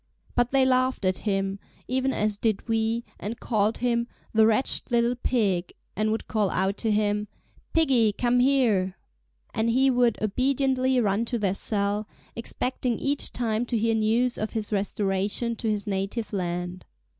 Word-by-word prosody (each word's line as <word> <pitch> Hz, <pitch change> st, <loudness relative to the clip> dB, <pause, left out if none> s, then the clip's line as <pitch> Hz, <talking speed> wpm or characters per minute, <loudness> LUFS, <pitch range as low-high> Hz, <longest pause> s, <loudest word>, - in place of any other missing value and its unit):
But 245 Hz, 0 st, +2 dB
they 270 Hz, 0 st, +3 dB
laughed 255 Hz, -4 st, +1 dB
at 185 Hz, 0 st, +1 dB
him, 195 Hz, 0 st, -1 dB, 0.3 s
even 260 Hz, +1 st, 0 dB
as 210 Hz, -4 st, 0 dB
did 220 Hz, -2 st, 0 dB
we, 225 Hz, +1 st, 0 dB, 0.2 s
and 230 Hz, +4 st, -5 dB
called 215 Hz, -1 st, +1 dB
him 235 Hz, -1 st, 0 dB, 0.3 s
"the 220 Hz, 0 st, +5 dB
wretched 225 Hz, +4 st, +1 dB
little 235 Hz, 0 st, +2 dB
pig," 200 Hz, -8 st, 0 dB, 0.2 s
and 215 Hz, +2 st, +1 dB
would 220 Hz, -, -3 dB
call 210 Hz, -3 st, +1 dB
out 190 Hz, +2 st, 0 dB
to 225 Hz, -, -1 dB
him: 210 Hz, 0 st, +1 dB, 0.4 s
"Piggy, 260 Hz, -9 st, +3 dB
come 245 Hz, +4 st, +1 dB
here!" 235 Hz, -8 st, +2 dB, 0.6 s
And 220 Hz, +2 st, +1 dB
he 265 Hz, +3 st, +4 dB
would 245 Hz, -2 st, +2 dB
obediently 260 Hz, +3 st, +1 dB
run 210 Hz, -1 st, +1 dB
to 240 Hz, -, -2 dB
their 200 Hz, -4 st, 0 dB
cell, 205 Hz, +1 st, 0 dB, 0.3 s
expecting 245 Hz, 0 st, -2 dB
each 280 Hz, 0 st, -1 dB
time 225 Hz, -1 st, -1 dB
to 235 Hz, -, 0 dB
hear 225 Hz, +1 st, +1 dB
news 225 Hz, +3 st, +1 dB
of 215 Hz, -, -3 dB
his 220 Hz, -2 st, -3 dB
restoration 205 Hz, +3 st, 0 dB
to 225 Hz, -, -2 dB
his 210 Hz, 0 st, -1 dB
native 205 Hz, +3 st, -3 dB
land. 180 Hz, -1 st, -3 dB
225 Hz, 160 wpm, -26 LUFS, 205-245 Hz, 0.6 s, the